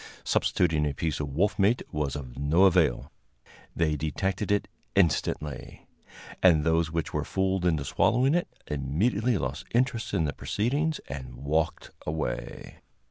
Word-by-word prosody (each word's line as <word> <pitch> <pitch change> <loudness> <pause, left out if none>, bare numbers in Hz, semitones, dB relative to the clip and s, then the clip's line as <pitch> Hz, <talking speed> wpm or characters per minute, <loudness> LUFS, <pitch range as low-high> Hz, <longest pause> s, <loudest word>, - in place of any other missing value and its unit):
Substituting 80 -4 +1
a 70 - -3
piece 80 -1 -2
of 75 -2 -3
wolf 90 +11 0
meat 105 +5 +3
was 75 -2 -2
of 65 -4 -7
no 75 +7 +3
avail; 85 -9 +3 0.6
they 80 -2 +1
detected 95 +7 -2
it 105 - +1 0.3
instantly, 75 -4 0 0.6
and 80 -5 +5
those 80 0 +2
which 80 -1 -3
were - - 0
fooled 95 -1 0
into 80 -5 +1
swallowing 130 +5 +2
it 175 +1 +1 0.2
immediately 100 - 0
lost 65 -2 -3
interest 120 -2 +1
in 80 -5 +2
the 70 - -2
proceedings 145 - -1
and 65 -3 -7
walked 75 +5 -1
away. 80 0 -4
80 Hz, 140 wpm, -27 LUFS, 75-100 Hz, 0.6 s, and